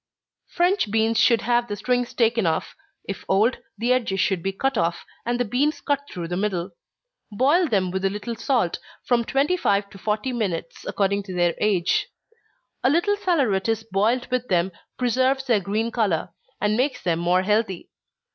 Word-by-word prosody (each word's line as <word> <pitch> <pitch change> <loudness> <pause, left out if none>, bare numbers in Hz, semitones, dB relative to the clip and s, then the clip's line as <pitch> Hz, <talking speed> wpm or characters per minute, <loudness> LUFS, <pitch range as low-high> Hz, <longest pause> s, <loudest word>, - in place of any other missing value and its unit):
_ - - -31
French 355 - +2
beans 225 +1 +2
should 235 -2 +4
have 240 0 +1
the 205 - -3
strings 245 +4 0
taken 230 -4 +2
off 160 -1 -1 0.3
if 195 - -5
old, 215 +6 +3 0.2
the 240 +4 +2
edges 230 -7 0
should 190 -2 +1
be 195 - -1
cut 270 +7 -1
off, 170 -4 -1 0.2
and 240 0 0
the 245 - +1
beans 275 +8 0
cut 285 -1 0
through 170 -2 -5
the 175 - -3
middle. 190 -2 -2 0.6
Boil 285 - +3
them 190 -7 +1
with 190 +1 -3
a 195 - +3
little 210 +4 -5
salt, 230 -6 0 0.2
from 240 -1 +2
twenty 275 +9 +1
five 200 - +1
to 195 - -12
forty 215 +6 -1
minutes, 185 -8 -3
according 200 0 0
to 190 -2 -8
their 175 -1 +2
age. 190 -4 +1 0.8
A 255 - +4
little 345 +8 +2
saleratus 225 - +1
boiled 225 +6 +2
with 250 -1 0
them 180 0 +1 0.3
preserves 260 +2 +1
their 235 -5 +3
green 215 +4 -2
color, 205 -9 0 0.3
and 210 +1 +1
makes 255 +2 0
them 170 -2 +1
more 180 +2 +2
healthy. 210 -2 -1
220 Hz, 180 wpm, -23 LUFS, 190-250 Hz, 0.8 s, should